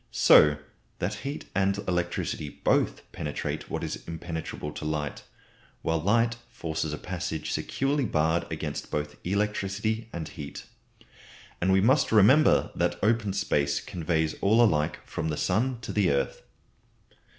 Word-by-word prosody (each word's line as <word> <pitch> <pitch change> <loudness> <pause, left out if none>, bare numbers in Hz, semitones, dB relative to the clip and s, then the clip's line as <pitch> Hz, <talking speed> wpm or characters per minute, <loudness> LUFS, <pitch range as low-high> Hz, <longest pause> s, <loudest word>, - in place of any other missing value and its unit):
So 75 -1 +6 0.4
that 90 +4 -2
heat 140 +2 -5
and 100 0 +2
electricity 85 -4 -1
both - - 0
penetrate - - -4
what - - -3
is - - -4
impenetrable 80 -2 -5
to - - -8
light; 75 -2 -3 0.6
while 80 0 +1
light 115 +7 +2
forces 80 -1 -3
a 75 - -3
passage 85 -3 -4
securely 140 0 0
barred 80 -2 +1
against - - -4
both 75 0 -3
electricity 105 +3 -1
and 80 -2 -5
heat. 75 -3 -8 1.0
And 95 +2 +3
we 95 0 +5
must 130 +8 +3
remember 120 +8 +5
that 85 0 0
open 110 -1 +2
space 75 -8 +1
conveys 80 -2 -1
all 110 +4 +5
alike 80 -7 +1
from 80 - -3
the 75 - -2
sun 120 +6 0
to - - -5
the 100 -4 +3
earth. 70 -1 0
90 Hz, 140 wpm, -27 LUFS, 80-105 Hz, 1.0 s, So